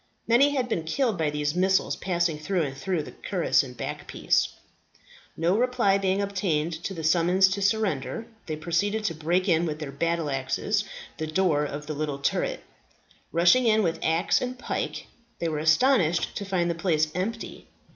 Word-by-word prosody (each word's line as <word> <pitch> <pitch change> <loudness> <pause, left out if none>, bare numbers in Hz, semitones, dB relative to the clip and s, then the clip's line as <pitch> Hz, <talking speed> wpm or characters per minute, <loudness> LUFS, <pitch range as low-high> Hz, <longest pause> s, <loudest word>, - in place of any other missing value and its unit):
Many 275 +5 +4
had 255 -2 0
been 175 -9 -1
killed 225 - 0
by 155 -2 +1
these 145 0 -1
missiles 190 +2 +2
passing 170 -4 -1
through 175 +2 0
and 135 -2 -4
through 165 +3 -2
the - - -9
cuirass 180 -4 +1
and 125 -3 -9
backpiece. - - 0 0.9
No 170 +4 +2
reply 235 -4 +2
being 195 +1 +1
obtained 175 -5 -1
to 195 - -3
the 165 - -6
summons 175 +4 +4
to 195 +1 -2
surrender, 205 - 0 0.2
they 155 - -2
proceeded 190 +7 -1
to 185 - 0
break 170 +5 0
in 170 -2 +3
with 155 -3 -2
their 150 -3 -6
battle 165 +1 -1
axes 135 +11 -1 0.3
the 155 - -3
door 155 -3 +1
of 145 +1 -6
the 155 - -4
little 145 -1 -3
turret. 140 - -1 0.7
Rushing 175 +9 +4
in 220 -1 +4
with 165 -2 -1
axe 160 +2 +2
and 255 0 -3
pike, 250 - -4 0.3
they 170 - -2
were 155 -2 -2
astonished 170 - +3
to 200 - -4
find 180 -3 0
the - - 0
place 160 -2 +1
empty. 225 +6 -4
170 Hz, 175 wpm, -26 LUFS, 155-200 Hz, 0.9 s, Many